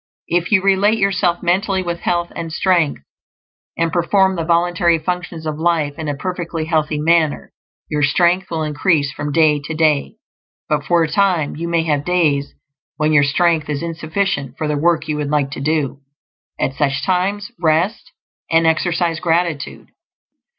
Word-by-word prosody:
If 175 +2 0
you 190 -3 +4
relate 195 +3 +3
yourself 185 -4 +1
mentally 190 +2 +1
with 170 -1 -3
health 175 -1 -1
and 165 -1 -5
strength, 170 - +1 0.7
and 165 -1 0
perform 190 +2 +2
the 165 - -2
voluntary 170 0 +2
functions 175 0 -4
of 155 -1 -4
life 160 -3 +1
in 160 - -4
a 145 - -2
perfectly 170 -2 -4
healthy 155 -2 0
manner, 160 -1 +1 0.3
your 150 -1 -2
strength 175 +5 +2
will 160 -2 -2
increase 150 -1 +1
from 145 +2 -5
day 150 -1 +3
to 155 +1 -5
day; 155 -3 +1 0.5
but 150 -1 0
for 170 -1 +3
a - - 0
time 180 -3 +1
you 170 +2 -4
may 170 -1 +1
have 150 -3 0
days 150 -5 0 0.4
when 155 0 +1
your 145 -2 +5
strength 155 +2 +1
is 145 +1 -2
insufficient 160 -4 -2
for 155 - -2
the 150 - 0
work 165 +2 +1
you 150 - -2
would 145 -1 -3
like 145 -2 0
to 135 - -6
do. 150 -2 -1 0.6
At 135 - 0
such 140 -1 -1
times 200 +4 -1
rest, 170 +6 0 0.4
and 165 0 +3
exercise 165 0 +1
gratitude. 165 -4 -2
165 Hz, 165 wpm, -18 LUFS, 150-175 Hz, 0.7 s, your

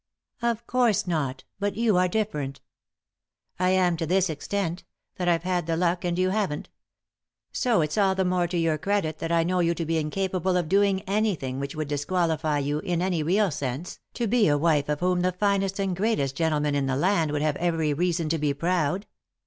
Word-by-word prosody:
" - - -42
"Of 230 0 -7
course 240 -5 +2
not; 140 -7 -2 0.2
but 200 -1 -1
you 225 -3 +2
are 180 0 +4
different" 150 -10 -2 1.0
"I 180 0 +2
am 185 -2 +3
to 165 -1 -2
this 185 0 +2
extent— 175 +3 -3 0.3
that 180 - -2
I've 170 -1 +2
had 180 -2 -1
the 165 -1 0
luck, 175 0 +1
and 175 -1 -1
you 185 0 +2
haven't 195 -8 -2 0.8
So 235 -9 +2
it's 150 +6 -1
all 195 -2 +3
the 190 0 +1
more 180 -1 +1
to 175 +1 -3
your 165 -2 +1
credit 160 -3 -1
that 165 - -3
I 165 -1 +3
know 180 +2 0
you 170 -1 +2
to 165 - -3
be 165 0 0
incapable 185 +3 -1
of 175 -3 -1
doing 195 +1 +3
anything 190 -10 -1
which 140 +1 -4
would 155 -1 -3
disqualify 155 0 0
you, 145 +1 -1
in 175 -1 -2
any 180 -2 0
real 190 +5 +2
sense, 140 +4 -4 0.2
to 240 - -1
be 225 0 +3
a 145 -1 +3
wife 150 -2 +2
of 150 +1 -1
whom 180 0 +2
the 185 +1 +2
finest 195 +1 0
and 195 -2 0
greatest 185 - 0
gentleman 150 -2 +1
in 140 -1 0
the 130 - 0
land 170 0 +2
would 150 0 -1
have 155 -2 +1
every 165 -3 0
reason 170 +1 0
to 165 0 0
be 145 -1 0
proud." 175 +3 0
175 Hz, 210 wpm, -26 LUFS, 155-190 Hz, 1.0 s, are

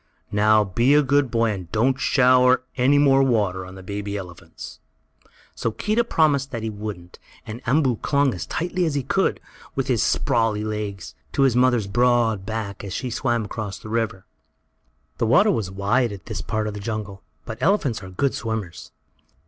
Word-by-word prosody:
Now 105 +1 +4
be 120 +8 +2
a 150 - +5
good 140 -1 +2
boy, 115 -1 +1
and 90 -5 -7
don't 130 +5 +1
shower 125 -2 +4
any 135 +3 +3
more 135 -2 +5
water 105 -8 +1
on 95 - -11
the 95 - -11
baby 100 +1 -4
elephants." 90 -4 -10 0.7
So - - -2
Keedah 215 - 0
promised 145 - +2
that 115 -4 -5
he 110 - -2
wouldn't, 100 -4 -8 0.3
and 110 +3 -7
Umboo 130 -3 +2
clung 140 -3 +2
as 90 - -6
tightly 180 +2 -1
as 155 -3 -1
he 140 - -1
could, - - 0 0.4
with - - -1
his - - +1
sprawly 110 -2 +1
legs, 105 -4 -5 0.2
to 140 - +2
his 130 -3 +3
mother's 125 -3 +3
broad 115 -2 +1
back 110 -3 -4
as 100 -2 -6
she 125 +4 -4
swam 120 -1 -1
across 105 -2 -5
the 110 - -11
river. 110 -4 -2 0.9
The 115 - +1
water 205 - +5
was 110 - -2
wide, 100 +5 0
at 95 -5 -9
this - - -5
part 110 0 -2
of 105 - -4
the 105 - -6
jungle, 100 -2 -5 0.2
but 110 -2 -7
elephants 140 - +1
are 95 - -9
good 130 +9 -1
swimmers. 110 - -5
115 Hz, 180 wpm, -23 LUFS, 100-130 Hz, 0.9 s, a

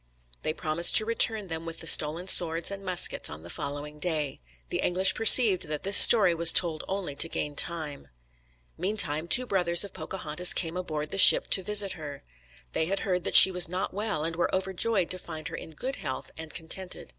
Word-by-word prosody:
They 155 - -4
promised 160 +1 -1
to 215 - +3
return 220 -2 +1
them 165 -1 -8
with 165 0 -10
the - - -11
stolen 160 +3 +3
swords 170 -1 +3
and 195 0 -9
muskets 185 -2 0
on 75 +2 -12
the 85 - -12
following 145 +1 -9
day. 155 - -5 0.3
The - - -6
English 185 +2 0
perceived 220 -5 +3
that 150 -1 -7
this 195 +1 +1
story 210 -7 +7
was 170 0 +5
told 170 -4 0
only 190 -6 -7
to 165 +3 0
gain 150 -2 -7
time. 150 - -4 0.7
Meantime 170 -5 -3
two 250 +10 +1
brothers 175 -5 +2
of 200 - -11
Pocahontas 180 -1 -1
came 165 -1 -4
aboard 155 -4 -7
the 195 - -5
ship - - +6
to 190 - +2
visit 205 0 0
her. 145 -3 -12 0.5
They 160 - -3
had 195 +2 -5
heard 180 -2 -4
that - - -2
she 190 - +9
was 180 -2 +1
not 185 +1 -6
well, 205 -6 -5
and 165 +1 -6
were 175 - -3
overjoyed 190 +1 -3
to 185 - -4
find 160 -3 -10
her 165 - -10
in 160 - -12
good 265 - -8
health 130 - -9
and 160 -1 -12
contented. 180 +2 -5
170 Hz, 205 wpm, -24 LUFS, 155-190 Hz, 0.7 s, she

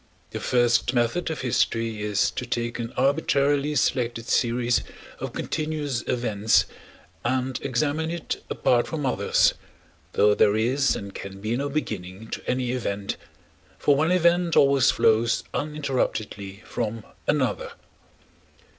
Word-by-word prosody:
The - - -4
first 120 0 +2
method 120 +10 +1
of 160 - -4
history 115 -3 0
is 105 -2 +1
to - - -4
take 120 0 -3
an 115 0 -4
arbitrarily 140 +1 +2
selected 120 -4 0
series 120 -1 +2 0.4
of - - -4
continuous 150 -5 -2
events 110 -3 +2 0.6
and 130 +1 -1
examine 145 +4 0
it 170 -1 -4
apart 120 -1 +2
from 155 -3 -3
others, 130 - +3 0.6
though 105 0 +5
there 105 0 +4
is 130 +5 +2
and 100 -1 -7
can 95 0 -8
be 110 +4 -1
no 140 +3 -2
beginning 110 -7 -4
to - - -4
any 125 -1 0
event, 100 -5 -2 0.6
for 145 - +3
one 160 +4 +2
event 175 -1 +3
always 140 -2 +5
flows 115 +1 +3
uninterruptedly 120 -9 -3
from 110 -1 -3 0.2
another. - - 0
125 Hz, 130 wpm, -25 LUFS, 110-145 Hz, 0.6 s, though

